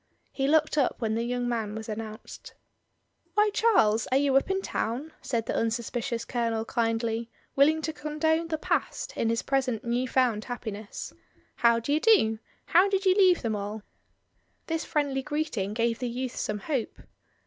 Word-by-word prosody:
He 270 -1 -1
looked 310 0 +3
up 270 - +2
when 220 -2 -1
the 225 - 0
young 245 0 -1
man 225 -3 -2
was 220 -1 -6
announced. 220 0 -8 0.8
Why, 420 0 +4
Charles, 230 - +3
are 260 - +2
you 275 -1 +2
up 270 - +3
in 385 0 0
town?" 265 +8 -3
said 230 -3 -2
the - - -2
unsuspicious 235 +1 -2
Colonel 230 -2 -1
kindly, 230 0 -1 0.3
willing 310 +3 +4
to 315 - -2
condone 315 +2 0
the 320 -1 -2
past - - -2
in 225 - 0
his 230 +1 0
present 260 -5 0
new 240 +2 0
found 245 -5 +1
happiness. 220 -4 -6 0.4
"How 235 -1 +4
d'y 285 +6 0
do? 315 - +4 0.3
How 370 +3 +5
did 390 0 0
you 375 - +6
leave 370 -5 +4
them 225 -2 0
all?" 205 +1 -5 0.8
This 325 -1 -2
friendly 285 -3 0
greeting 295 -9 -2
gave 230 0 0
the 250 -1 -2
youth 250 +1 -4
some 210 - -2
hope. 245 +3 -3
245 Hz, 170 wpm, -27 LUFS, 225-305 Hz, 0.8 s, you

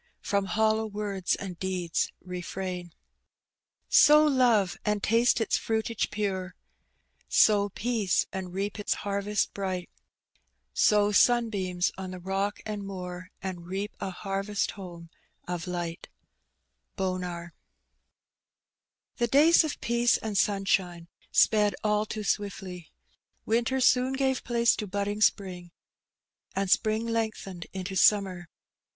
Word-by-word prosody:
From 200 -1 0
hollow 220 +2 +1
words 205 -3 -2
and 180 -4 -7
deeds 180 -3 -1
refhuti' 180 0 -5 1.0
Sow 300 +1 +7
love, 240 -9 +3
and 210 -1 -1
tMte 235 +3 +3
its 225 - +1
fmitsge 225 0 -1
pore; 190 -3 -3 0.7
Sow 205 -1 +4
peaoo, 215 -2 0
and 190 -2 -5
reap 200 +3 -3
its 205 - 0
hurrest 200 +1 -1
bright 185 -3 -4
i - - -47 0.8
Sow 210 - +4
soDbeams 200 -6 +2
od 190 -1 -5
the 185 - -7
rook 195 +3 -2
uid 210 -1 -4
moor, 185 -2 -7
And 180 -3 -5
reap 195 +3 -4
a. 190 - -3
barrest 195 +1 -1
home 170 -4 -10 0.4
of 175 -1 -4
light 175 -2 -4 0.9
^:±^ 180 -2 -3 1.7
HE 240 - +2
days 300 +8 +6
of 310 - -4
peace 235 0 +2
and 215 -2 -5
Banabine 190 -4 0 0.2
sped 210 -2 +4
all 210 0 +1
too 215 0 -4
swiftly. 195 -4 -3 0.6
Winter 235 +4 +1
Boon 255 +1 -1
gave 265 -1 0
place 235 -1 +2
to 210 - -4
bodding 200 +2 -2
spring, 185 -5 +1 0.9
and 195 -1 -1
spring 220 +1 +2
lengthened 220 -6 -3
into 190 0 -5
summer. 185 -3 +3
200 Hz, 120 wpm, -28 LUFS, 185-220 Hz, 1.7 s, Sow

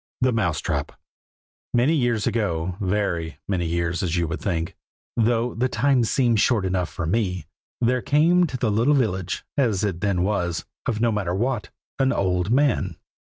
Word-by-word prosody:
THE 130 0 +3
MOUSE 85 - 0
TRAP. - - -2 0.8
MANY 125 +7 +4
years 120 -7 +1
ago, 90 -6 -1
very 90 -5 -1
many 90 -4 0
years 85 +2 -1
as 90 -2 -1
you 85 -1 +1
would 80 - -4
think, 85 -4 -2 0.4
though 115 +1 +1
the 125 +3 0
time 130 +1 +2
seems 120 -2 +2
short 110 -6 +2
enough 90 -2 0
for 85 - -4
me, 90 0 -1 0.3
there 125 +1 +2
came 170 - +4
to 130 - -4
the 120 -4 0
little 120 +8 +3
village 95 -9 -1
(as 110 -8 +2
it 90 -4 -2
then 100 -4 +1
was), 90 -4 -1 0.2
of 110 -3 -1
Nomatterwhat, 105 +2 0 0.3
an 135 0 +3
old 90 -1 0
man. 120 - +2
105 Hz, 160 wpm, -24 LUFS, 90-120 Hz, 0.8 s, MANY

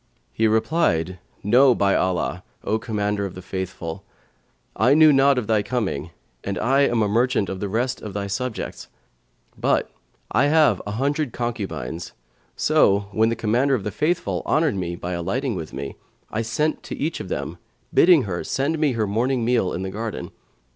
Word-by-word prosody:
He 110 - +2
replied, 110 - +1 0.2
"No 125 +5 +5
by 100 -1 +2
Allah, 90 0 0 0.2
O 110 +1 0
Commander 105 -2 -1
of 95 -2 -5
the 90 - -8
Faithful, 90 -3 -5 0.7
I 125 +7 +4
knew 155 -1 +7
not 135 0 +4
of 125 - 0
thy 110 -1 +2
coming 100 - -2 0.3
and 100 -1 -3
I 135 +6 +3
am 115 -2 +1
a - - +1
merchant 115 -1 +1
of 95 - -4
the 100 - -3
rest 125 +5 -1
of 105 -2 -7
thy 100 -1 -2
subjects; 110 +4 -4 0.7
but - - 0 0.4
I 130 +6 +3
have 155 0 +4
an 105 - -3
hundred 140 +3 -1
concubines; 100 - -4 0.4
so, 100 0 +3
when 110 +2 +2
the 115 - 0
Commander 120 +5 +2
of 110 - -3
the 105 - -3
Faithful 160 +4 -1
honoured 155 -2 +2
me 85 -3 -3
by 90 +1 -5
alighting 100 +10 -2
with 80 -5 -6
me, 70 +1 -6 0.4
I 110 - -1
sent 150 +8 -1
to - - -6
each 160 +2 -2
of 95 - -7
them, - - -4 0.3
bidding 170 -6 +6
her 90 -4 -3
send 145 +4 -1
me 150 -4 +2
her 110 -2 0
morning 120 +4 0
meal 120 -6 +2
in 90 - -3
the 95 - -4
garden. 105 -4 -5
110 Hz, 180 wpm, -23 LUFS, 95-130 Hz, 0.7 s, knew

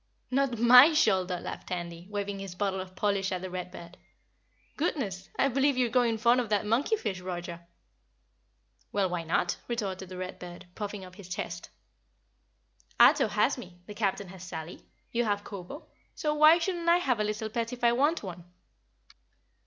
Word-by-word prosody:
"Not 265 -2 +1
MY 250 +7 +8
shoulder," 190 - +2
laughed - - -7
Tandy, 175 -1 -5
waving 205 -1 -3
his 195 -2 -7
bottle 195 0 -1
of 185 0 -10
polish 200 -1 0
at 185 -1 -3
the 185 - -5
Read 180 0 -5
Bird. 170 0 -12 0.8
"Goodness, 215 - -2
I - - +3
believe 275 +1 +2
you're 245 -2 +1
growing 240 -2 +2
fond 235 +3 +4
of 230 - -5
that 210 0 +1
monkey 240 - +2
fish, 210 - -4
Roger." 175 -2 -6 1.2
"Well, 200 -2 +1
why 175 -1 -2
not?" 170 +2 0
retorted 195 -6 -3
the 185 - -8
Read 185 0 -6
Bird, 175 +1 -9
puffing 205 -2 -5
up 185 +1 -14
his 195 -3 -11
chest. 180 -2 -5 1.3
"Ato - - +7
has - - +1
me, 180 -7 -11
the 210 - -9
Captain 200 -2 -2
has 185 -1 -11
Sally, 165 -2 -7 0.3
you 240 +1 +1
have 205 -1 0
Kobo, 200 - -9 0.3
so 300 -3 -1
why 305 +2 +7
shouldn't 340 -1 -1
I 340 - +6
have 260 -10 0
a - - +2
little 215 +1 -2
pet 230 +1 -2
if 245 -1 -8
I 235 - +6
want 290 +6 +1
one?" 175 -3 -7
205 Hz, 175 wpm, -29 LUFS, 185-245 Hz, 1.3 s, MY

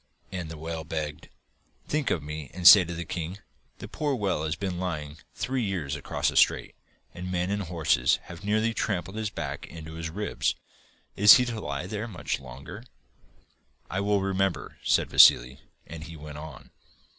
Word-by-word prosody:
And 90 -4 -5
the 80 - -8
whale 80 +1 -5
begged: 75 -2 -5 0.6
'Think 150 -2 0
of 80 - -1
me 75 -2 -6
and 90 -2 +4
say 95 +3 +11
to 85 0 -6
the 85 +1 -5
king: 85 +3 -5 0.4
"The - - -8
poor 150 -3 -2
whale 95 -9 -1
has 80 +2 -1
been 90 -2 -4
lying 75 -5 -4 0.2
three 130 0 -2
years 95 - -2
across - - -1
the - - -7
strait, - - +3 0.4
and 90 +1 -6
men 90 +1 -1
and 100 0 -1
horses 80 -9 +2
have 85 +3 -11
nearly 110 +2 +1
trampled 95 -3 -2
his 110 -1 -2
back - - -5
into 80 -1 -9
his 80 0 -5
ribs. 105 +6 -1 0.6
Is 105 +2 +9
he 125 0 +3
to 115 -3 -4
lie 70 -1 -4
there 105 +3 -4
much 90 - -3
longer?"' 70 - -10 1.1
'I 90 - -1
will 100 0 +1
remember,' 95 -1 -1
said - - +2
Vassili, 60 +2 +6 0.3
and 80 -1 -9
he 85 0 -9
went 75 -1 -9
on. 75 -3 -11
90 Hz, 180 wpm, -27 LUFS, 80-100 Hz, 1.1 s, say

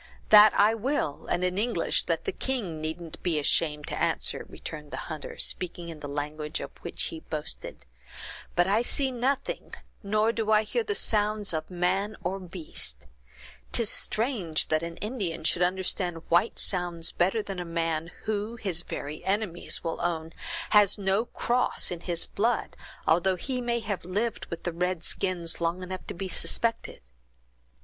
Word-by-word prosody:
"That 210 0 +10
I 210 +2 +6
will, 225 - -1
and 175 - 0
in 180 +1 +1
English 235 +3 +1
that - - -1
the 400 - 0
king 215 - -3
needn't 160 +1 -5
be 170 -3 +1
ashamed 150 0 +2
to - - -3
answer," - - 0
returned 150 -1 -8
the - - -5
hunter, 155 -3 -6
speaking 175 -1 -2
in 160 -2 -7
the 145 - -6
language 150 +2 -3
of - - -6
which 170 - -3
he 160 - -6
boasted; 150 - -6 0.7
"but 175 - +5
I 205 +4 +3
see 265 +2 +1
nothing, 260 +3 -1 0.3
nor 215 +2 +2
do 225 -2 -2
I 215 0 +6
hear 470 - 0
the 420 -1 -1
sounds 210 - +2
of 155 -1 -2
man 190 +4 0
or 195 +1 -1
beast; 165 - -5 0.7
'tis 230 -3 +5
strange 215 - +1
that 155 0 +2
an 170 0 -5
Indian 205 -8 -3
should 170 +2 +2
understand 180 -2 0
white 170 +7 +3
sounds 175 -3 +1
better 195 +5 +2
than 195 -3 -5
a - - -2
man 165 -1 -1
who, 215 +1 -2
his 190 -7 -1
very 150 -2 -6
enemies 195 -3 0
will 165 -1 -2
own, 165 -1 -1 0.4
has 210 -2 +6
no 200 +3 +2
cross 245 -3 +1
in 175 - -3
his 170 -1 0
blood, 230 +3 0 0.3
although 175 +3 +4
he 250 +7 -3
may 235 -1 0
have 205 -4 -3
lived 205 +6 -2
with 170 - -6
the 175 - -2
red 180 0 -1
skins 175 -4 0
long 170 +2 0
enough 185 +1 -6
to - - -5
be 190 +2 -3
suspected! 230 +4 -1
180 Hz, 170 wpm, -28 LUFS, 165-215 Hz, 0.7 s, That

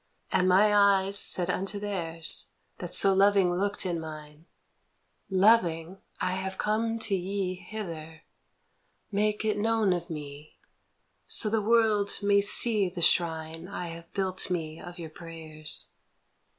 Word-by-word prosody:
" - - -32
And 185 0 +2
my 205 +3 +4
eyes 200 -1 +3
said 180 0 +2
unto 195 +3 -3
theirs 170 -6 +2 0.3
That 180 0 -4
so 195 +1 +5
loving 195 -2 +3
looked 200 +3 -1
in 175 -2 -2
mine: 155 0 -10 0.5
' - - -46 0.2
Loving, 180 -5 +2 0.2
I 185 - -1
have 190 +1 -4
come 225 +2 -1
to 220 -2 -3
ye 190 0 -2
Hither; 170 -5 -9 0.9
make 210 +1 -1
it 210 -1 -1
known 220 -3 +1
of 175 - -5
me, 150 -1 -9 0.7
So 215 - +4
the 220 -1 0
world 215 -2 +2
may 200 0 +3
see 205 -1 +4
the 175 -1 -5
shrine 165 0 0
I 180 -2 -6
have 165 0 -11
built 190 -1 -2
me 160 -3 -4
of 175 0 -10
your 165 -3 -9
prayers 155 -2 -3
185 Hz, 145 wpm, -27 LUFS, 165-205 Hz, 0.9 s, so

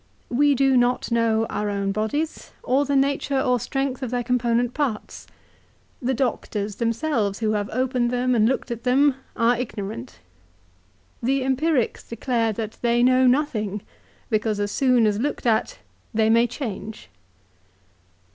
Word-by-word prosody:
We 285 +3 +3
do 270 0 +3
not 245 0 +1
know 225 -1 +2
our 210 0 -2
own 200 -1 -1
bodies, 220 +10 -3
or 270 +3 +2
the 285 0 0
nature 275 0 +1
or 250 -1 +2
strength 270 +2 -2
of 260 - -3
their 245 0 -1
component 240 0 +1
parts. 270 -8 -3 0.7
The 260 +1 0
doctors 210 -5 -2
themselves, 230 -3 0
who 220 -1 0
have 205 -1 -1
opened 250 0 0
them 250 +1 +1
and 225 -1 +4
looked 265 -1 -2
at 235 -1 -4
them, 270 +3 +4 0.2
are 235 0 +3
ignorant. 205 - -6 1.0
The 265 +2 +1
Empirics 265 0 0
declare 230 -1 -1
that 220 0 -6
they 240 0 +2
know 255 +1 +5
nothing; 220 -7 0 0.5
because 215 -1 0
as 205 0 -1
soon 250 -3 +3
as 210 -1 +1
looked 285 +2 -2
at 220 -2 +1 0.4
they 220 0 +3
may 230 +1 +4
change." 220 -4 -6
240 Hz, 145 wpm, -23 LUFS, 220-260 Hz, 1.0 s, know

